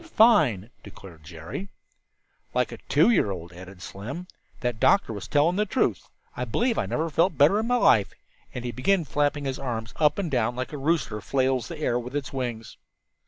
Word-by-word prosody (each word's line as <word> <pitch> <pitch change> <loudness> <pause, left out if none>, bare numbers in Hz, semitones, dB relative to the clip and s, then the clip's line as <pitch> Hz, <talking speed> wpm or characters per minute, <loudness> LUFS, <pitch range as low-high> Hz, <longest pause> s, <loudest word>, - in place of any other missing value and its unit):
"Fine," 145 - +4
declared 90 -5 -13
Jerry. 80 - -7 0.9
"Like - - +1
a - - -8
two - - +5
year 180 - +3
old," 90 -2 -6
added 90 +1 -11
Slim. 125 - -7 0.4
"That 120 -3 -2
doctor 195 - +3
was 100 -3 -7
telling 155 +5 +2
the 210 - +2
truth. 190 - 0 0.3
I 125 - -3
believe 230 - 0
I - - -1
never 160 +2 -1
felt 170 +2 +2
better 155 +9 +5
in 220 - -2
my 245 - +2
life," 110 - +4 0.4
and 125 -1 -6
he 120 - -2
began 170 +8 +1
flapping 145 0 0
his 135 -1 -3
arms 120 -3 -4
up 150 -2 +3
and 185 -6 -2
down 120 -2 0
like 130 +3 -4
a - - -4
rooster 135 -8 0
flails 130 +3 0
the 170 - -7
air 125 -5 0
with 125 +3 -7
its 140 -2 -3
wings. 120 -4 -5
130 Hz, 195 wpm, -26 LUFS, 110-165 Hz, 0.9 s, two